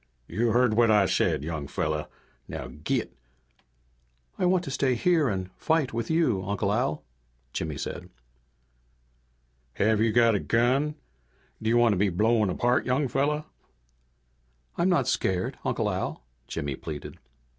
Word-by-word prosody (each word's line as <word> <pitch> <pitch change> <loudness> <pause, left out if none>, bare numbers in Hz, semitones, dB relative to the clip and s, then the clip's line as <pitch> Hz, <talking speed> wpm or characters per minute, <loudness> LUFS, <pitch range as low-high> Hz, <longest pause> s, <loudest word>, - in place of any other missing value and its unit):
"You 115 +2 0
heard 125 -1 +3
what 115 +1 +4
I 105 -2 +5
said, 70 - +1
young 80 -3 -4
fella. 75 +2 -2 0.4
Now 65 - -6
git!" 75 +5 -3 1.2
"I 180 - +3
want 180 0 +2
to 140 - -5
stay 135 -2 +1
here 160 +2 +2
and 95 -2 -3
fight 160 -6 +1
with 115 0 -3
you, 160 - +2
Uncle 100 +1 -1
Al," 105 -9 -1 0.5
Jimmy 80 -3 -3
said. - - -6 1.6
"Have 110 +5 +2
you 115 0 +3
got 115 0 +4
a 100 - +1
gun? 130 +8 +1 0.7
Do 110 - 0
you 120 - +4
want 120 -2 +5
to - - -1
be 100 +2 +2
blown 110 +3 +2
apart, 120 +7 +1
young 135 +3 +1
fella?" 150 +4 0 1.3
"I'm 175 +2 +2
not 155 -9 +2
scared, 95 -1 -1
Uncle - - 0
Al," - - -3 0.2
Jimmy 70 -2 -3
pleaded. 75 +1 -8
115 Hz, 145 wpm, -27 LUFS, 95-135 Hz, 1.6 s, I